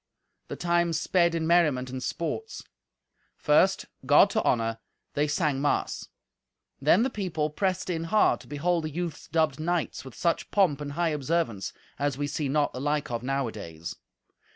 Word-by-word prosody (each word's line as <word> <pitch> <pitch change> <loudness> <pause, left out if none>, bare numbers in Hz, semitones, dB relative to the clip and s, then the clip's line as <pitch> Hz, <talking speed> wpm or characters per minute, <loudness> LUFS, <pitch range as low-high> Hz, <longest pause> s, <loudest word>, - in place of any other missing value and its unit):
The - - -5
time 170 -1 +1
sped 170 0 +2
in 165 -1 -1
merriment 150 -7 +3
and 130 0 -5
sports. 430 - -4 0.7
First, 185 +6 +3 0.2
God 145 +9 +6
to 220 - +1
honour, 115 -1 +1 0.3
they 145 +1 +1
sang 150 -2 0
mass. 145 - -1 0.7
Then 165 +10 +5
the 260 - 0
people 165 -8 -2
pressed 185 +3 -1
in 165 -2 -2
hard 210 +6 +3
to - - -15
behold 165 +3 0
the - - -2
youths 170 +1 -5
dubbed 160 -4 +1
knights 170 0 -1
with 130 -2 -11
such 170 -2 0
pomp 175 -8 +2
and 145 -1 -5
high 170 +2 +1
observance 150 - -1 0.3
as 140 -2 0
we 145 - -1
see 145 0 -2
not 145 +1 +1
the 130 - -5
like 145 -1 -1
of 120 -1 -2
nowadays. 115 -12 -4
150 Hz, 165 wpm, -27 LUFS, 140-170 Hz, 0.7 s, God